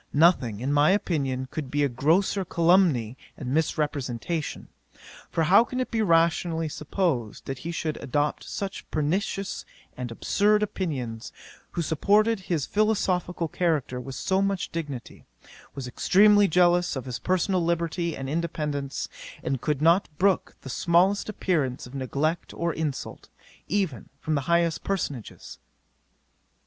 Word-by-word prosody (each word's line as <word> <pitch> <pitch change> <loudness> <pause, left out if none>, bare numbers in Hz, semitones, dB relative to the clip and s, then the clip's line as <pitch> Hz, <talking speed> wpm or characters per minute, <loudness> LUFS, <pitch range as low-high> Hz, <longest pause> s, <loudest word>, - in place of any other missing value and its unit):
Nothing 140 - +3
in 135 +3 0
my 145 +2 +5
opinion 140 -10 0
could 150 -4 -4
be 145 +2 +1
a - - +4
grosser 165 +10 +2
calumny 165 - +3 0.2
and 130 -2 -4
misrepresentation; 150 -1 -2 0.6
for 165 - 0
how 195 +8 +6
can 255 +2 -5
it 255 - -2
be 225 -2 +1
rationally 165 -2 +2
supposed, 150 - -2
that 135 -1 -5
he 170 - -5
should 160 -2 -3
adopt 145 +3 -1
such 195 -1 -5
pernicious 195 +6 -1 0.3
and 125 -1 -5
absurd 210 - +2
opinions, 130 - -4 0.4
who 170 - -1
supported 210 +8 +2
his 175 -6 -2
philosophical 185 -5 0
character 150 -7 -1
with 135 +1 -7
so 190 0 +1
much 195 -2 -1
dignity, 145 -7 -6 0.5
was 135 -2 -5
extremely 205 +10 +5
jealous 175 0 +3
of 130 - -4
his 125 -2 -4
personal 185 0 +1
liberty 170 0 -1
and 135 - -5
independence, 150 -3 -2 0.4
and 135 -3 -2
could 150 -1 -1
not 170 +5 +4
brook 190 -1 +1
the 135 - -7
smallest 180 - +2
appearance 155 -11 -1
of 125 - -12
neglect 140 +5 -2
or 170 -1 -1
insult, 150 -4 -4 0.4
even 185 - -1
from 155 - -2
the 140 - +1
highest 170 -1 +2
personages? 145 - -4
165 Hz, 135 wpm, -26 LUFS, 140-185 Hz, 0.6 s, how